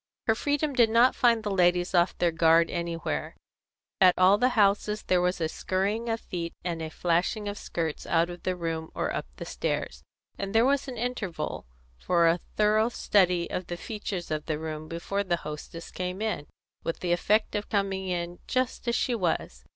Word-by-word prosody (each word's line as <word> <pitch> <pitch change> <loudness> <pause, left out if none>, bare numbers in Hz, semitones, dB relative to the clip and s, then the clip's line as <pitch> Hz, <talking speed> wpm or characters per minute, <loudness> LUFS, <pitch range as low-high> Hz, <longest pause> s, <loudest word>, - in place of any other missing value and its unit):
Her 220 - +4
freedom 290 +5 0
did 240 -3 +4
not 235 +3 +5
find 230 -2 +3
the 205 - -2
ladies 180 -1 +2
off 175 0 +3
their 175 -1 +2
guard 165 0 +4
anywhere. 170 -1 -3 0.6
At 185 -2 +6
all 190 +3 +5
the 250 - +4
houses 210 +1 +2
there 180 -1 +2
was 180 +1 0
a 160 - +1
skurrying 200 +8 -1
of 225 0 -1
feet 170 -2 -5
and 170 -2 -3
a 160 - -4
flashing 180 +6 0
of 205 - -3
skirts 165 -6 -4
out 170 0 +3
of 175 0 -8
the 185 - -1
room 165 -2 -3
or - - -1
up - - -3
the - - -7
stairs, - - -3 0.4
and 195 +2 -4
there 225 +2 +6
was 280 +1 +2
an 255 -2 -6
interval 215 - -3 0.3
for 170 -2 +3
a 165 +2 +3 0.2
thorough 215 +2 +3
study 180 -7 +2
of 180 - -3
the 175 - -4
features 200 -4 -5
of 155 -1 -3
the 155 -2 -1
room 155 0 -5
before 175 +5 -2
the 175 -3 0
hostess 150 +2 -7
came 180 +1 -4
in, 215 -9 -2 0.4
with 165 - -3
the 175 - -1
effect 210 +5 +2
of 205 0 -3
coming 195 -2 -1
in 175 -1 -3
just 255 -1 -1
as 235 - +2
she 250 - +1
was. 165 - -2
180 Hz, 195 wpm, -27 LUFS, 170-215 Hz, 0.6 s, At